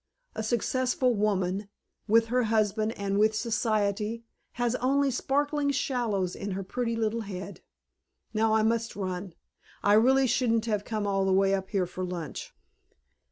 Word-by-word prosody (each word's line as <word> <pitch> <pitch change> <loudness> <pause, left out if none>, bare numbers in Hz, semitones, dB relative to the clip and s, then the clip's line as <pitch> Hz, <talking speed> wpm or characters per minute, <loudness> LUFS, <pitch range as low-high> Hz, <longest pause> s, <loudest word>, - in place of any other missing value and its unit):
A - - -4
successful 250 +3 +1
woman 200 -2 0 0.4
with 225 +1 +4
her 250 0 +2
husband 215 0 +1
and 200 -1 -1
with 215 +1 +3
Society 215 0 -1 0.3
has 240 -1 0
only 275 +2 +2
sparkling 285 +3 0
shallows 235 -9 -1
in 200 -1 -4
her 195 +1 -3
pretty 230 +4 -2
little 225 0 -1
head. 195 -1 -7 0.7
Now, 220 0 +2
I 220 - +3
must 230 +1 0
run. 185 -2 -4 0.5
I 205 - +4
really 260 +5 +5
shouldn't 230 -2 +1
have 210 -3 -1
come 215 -2 -2
all 195 -1 +1
the 190 - +1
way 195 +1 +3
up 190 -1 -2
here 195 -3 +1
for 185 +1 -6
lunch." 175 -3 -5
215 Hz, 155 wpm, -28 LUFS, 195-235 Hz, 0.7 s, really